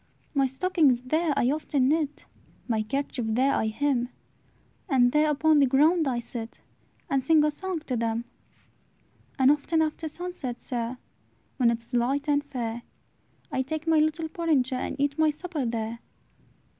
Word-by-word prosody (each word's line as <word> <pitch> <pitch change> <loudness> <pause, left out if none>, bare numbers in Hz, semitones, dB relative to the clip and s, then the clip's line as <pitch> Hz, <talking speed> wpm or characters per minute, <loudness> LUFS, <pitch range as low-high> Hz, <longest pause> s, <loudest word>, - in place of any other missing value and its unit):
"My 275 -2 +3
stockings 285 -2 +2
there 310 +5 0
I 250 0 +3
often 290 -3 0
knit, 300 0 0 0.4
My 225 -3 +1
kerchief 255 0 -2
there 255 +5 +2
I 220 - +1
hem; 245 +1 0 0.8
And 245 -4 +4
there 300 +2 +3
upon 305 +1 +3
the 275 - +5
ground 305 +5 +3
I 250 -2 0
sit, 230 -1 -6 0.5
And 275 -5 0
sing 310 +2 +5
a 300 - +3
song 365 +1 -3
to 265 -5 -3
them. 230 0 -1 1.1
"And 265 0 +5
often 300 +3 +1
after 315 +1 -1
sunset, 310 -7 -5
sir, 240 0 -3 0.6
When 245 -3 +4
it 230 0 -1
is 230 - -10
light 265 +5 +1
and 290 -1 +2
fair, 240 -5 -4 0.7
I 260 - 0
take 310 +4 -4
my 325 -1 +4
little 315 +1 +1
porringer, 310 -6 0
And - - -3
eat 285 +2 -1
my 315 -1 +5
supper 305 -3 -3
there. 230 0 -3
280 Hz, 160 wpm, -27 LUFS, 245-310 Hz, 1.1 s, the